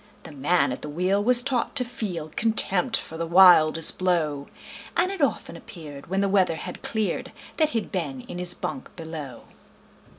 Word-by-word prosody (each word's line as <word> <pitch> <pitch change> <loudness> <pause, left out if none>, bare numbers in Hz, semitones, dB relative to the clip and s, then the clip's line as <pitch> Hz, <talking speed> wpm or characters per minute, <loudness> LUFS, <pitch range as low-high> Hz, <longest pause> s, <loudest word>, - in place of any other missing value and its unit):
The 160 - -11
man 145 +3 +1
at 125 - -6
the - - -7
wheel 185 +6 0
was 245 +2 +4
taught 255 0 -1
to 255 -3 +2
feel 180 -10 -6
Contempt 220 -5 +4
for 160 - -8
the 165 0 -3
wildest 165 -3 +5
blow, 155 -6 -1 0.5
And 370 - +2
it 390 -4 -6
often 225 -10 -1
appeared, 160 -7 -11
when 190 +3 -1
the 200 - +1
weather 190 -4 +2
had 180 +3 -8
cleared, 220 -2 -3 0.3
That 310 -2 +2
he'd 225 -7 -3
been 145 -9 -4
in 175 - -9
his 180 0 0
bunk 265 - -7
below. 160 -7 -8
180 Hz, 175 wpm, -24 LUFS, 160-220 Hz, 0.5 s, wildest